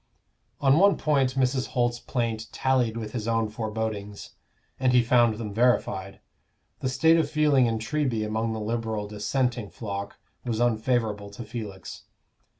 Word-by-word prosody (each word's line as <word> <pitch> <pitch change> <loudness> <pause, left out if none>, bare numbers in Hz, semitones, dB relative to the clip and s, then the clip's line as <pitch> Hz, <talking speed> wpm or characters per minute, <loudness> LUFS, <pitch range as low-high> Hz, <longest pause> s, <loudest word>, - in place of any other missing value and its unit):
On 140 +2 +5
one 200 +1 +5
point 135 -4 +1
Mrs. 130 0 +1
Holt's 120 0 +1
plaint 115 -3 -2
tallied 125 -4 +1
with 110 -2 -5
his 115 -2 -4
own 115 -1 +1
forebodings, 105 -2 -4 0.5
and 130 -1 +2
he 125 -1 +5
found 120 -1 +4
them 105 -2 -5
verified: 100 -4 +1 0.6
the 130 - -1
state 160 +5 +4
of 165 - +1
feeling 150 -5 +3
in 115 -1 0
Treby 115 -2 -1
among 110 +1 -1
the 110 - -3
Liberal 110 -1 -2
Dissenting 115 +2 -1
flock 100 -2 -6 0.3
was 115 -3 -2
unfavorable 110 -3 0
to 100 +4 -8
Felix. 105 -4 -8
115 Hz, 150 wpm, -26 LUFS, 110-125 Hz, 0.6 s, On